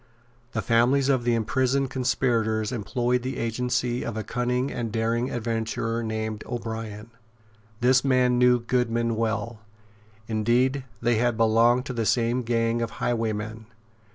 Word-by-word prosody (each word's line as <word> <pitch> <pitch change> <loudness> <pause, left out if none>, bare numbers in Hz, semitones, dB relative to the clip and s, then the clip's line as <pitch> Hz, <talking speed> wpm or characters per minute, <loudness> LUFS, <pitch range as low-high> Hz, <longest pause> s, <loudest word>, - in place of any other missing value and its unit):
The 110 - -2
families 125 +6 +3
of 130 -3 +2
the 120 -1 +3
imprisoned 130 +4 0
conspirators 115 -3 0
employed 120 +2 -1
the 130 +2 -4
agency 120 +1 -1
of 110 - -4
a 110 - -2
cunning 125 +3 -1
and 115 -2 -3
daring 115 +2 0
adventurer 115 0 -2
named 110 -1 -3
O'Brien. 115 -2 -5 0.7
This 125 +1 +4
man 125 -2 +3
knew 125 0 +5
Goodman 115 -1 0
well. 110 0 -2 0.7
Indeed 120 +5 +1 0.2
they 120 -1 +3
had 120 0 +1
belonged 115 +3 +4
to 130 - -4
the 115 -3 -1
same 120 +1 +1
gang 115 0 0
of 115 - -3
highwaymen. 110 -1 -2
115 Hz, 135 wpm, -25 LUFS, 115-125 Hz, 0.7 s, knew